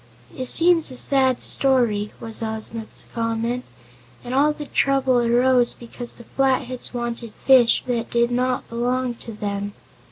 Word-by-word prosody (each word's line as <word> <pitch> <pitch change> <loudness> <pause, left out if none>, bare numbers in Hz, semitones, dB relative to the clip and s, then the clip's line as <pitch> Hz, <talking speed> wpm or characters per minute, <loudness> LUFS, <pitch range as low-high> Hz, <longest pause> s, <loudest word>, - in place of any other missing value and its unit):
"It 255 - -4
seems 335 +1 +5
a 255 - -6
sad 260 -2 +2
story," 235 -6 +2
was 225 +1 -6
Ozma's 220 0 -6
comment, 230 +2 -2 0.6
"and 245 0 -6
all 285 +3 +3
the 300 0 -7
trouble 270 -3 +2
arose 245 +1 +3
because 240 0 -8
the 235 - -12
Flatheads 260 0 -1
wanted 235 -2 -5
fish 255 -3 +5
that 240 -2 -2
did 235 0 +1
not 250 +1 -1
belong 245 +1 -1
to 230 - -8
them." 205 -1 -4
245 Hz, 140 wpm, -22 LUFS, 230-260 Hz, 0.6 s, seems